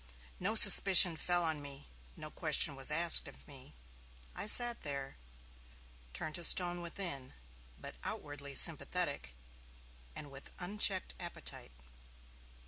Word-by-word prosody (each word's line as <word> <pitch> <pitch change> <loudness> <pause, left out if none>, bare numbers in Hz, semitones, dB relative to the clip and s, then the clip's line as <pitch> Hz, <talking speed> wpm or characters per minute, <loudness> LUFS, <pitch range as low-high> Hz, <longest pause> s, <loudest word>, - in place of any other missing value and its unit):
No 205 +5 -2
suspicion 190 -4 +7
fell 175 +2 -2
on 160 -3 -4
me; 140 0 -12 0.3
no - - -9
question 140 - 0
was 135 +1 -2
asked 165 +2 +3
of - - -18
me. 130 - -15 0.6
I - - -7
sat 240 +2 +1
there, 140 - -8 1.0
turned 155 - -9
to 175 - -5
stone 175 +1 0
within, 170 -7 -6 0.5
but - - -12
outwardly 145 -1 -9
sympathetic 60 - +2 0.8
and 145 -2 -11
with 135 0 -13
unchecked 190 +1 -2
appetite. 175 - -10
165 Hz, 120 wpm, -31 LUFS, 140-180 Hz, 1.0 s, suspicion